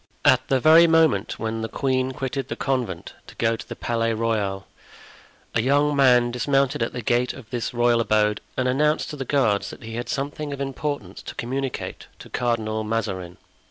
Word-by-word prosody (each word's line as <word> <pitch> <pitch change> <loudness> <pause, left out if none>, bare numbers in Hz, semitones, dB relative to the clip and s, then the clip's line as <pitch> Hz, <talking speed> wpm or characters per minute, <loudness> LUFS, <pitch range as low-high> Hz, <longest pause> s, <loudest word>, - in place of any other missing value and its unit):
At 130 0 +5
the 135 0 +2
very 160 +5 +7
moment 160 -11 +3
when 110 0 -3
the 110 - -3
queen 130 -1 0
quitted 135 -1 -3
the - - -4
convent 125 -11 -2
to - - -13
go 115 0 +1
to - - -10
the - - -5
Palais 115 -1 -1
Royal, 105 -4 -1 0.9
a - - +2
young 145 +4 +2
man 125 -3 +5
dismounted 135 +1 +1
at 115 - 0
the 120 - -5
gate 120 +1 +1
of 130 -5 -12
this 120 -2 -2
royal 120 -1 +3
abode 105 -2 +2 0.2
and 130 - +1
announced 150 +4 +1
to - - -5
the 135 -2 -5
guards 115 -8 +1
that - - -11
he 115 0 -7
had 120 0 -4
something 145 +1 -3
of 140 - -7
importance 135 -7 -4
to - - -8
communicate 135 +2 -4
to - - -12
Cardinal 110 -3 -1
Mazarin. 100 -5 -3
120 Hz, 190 wpm, -24 LUFS, 115-135 Hz, 0.9 s, very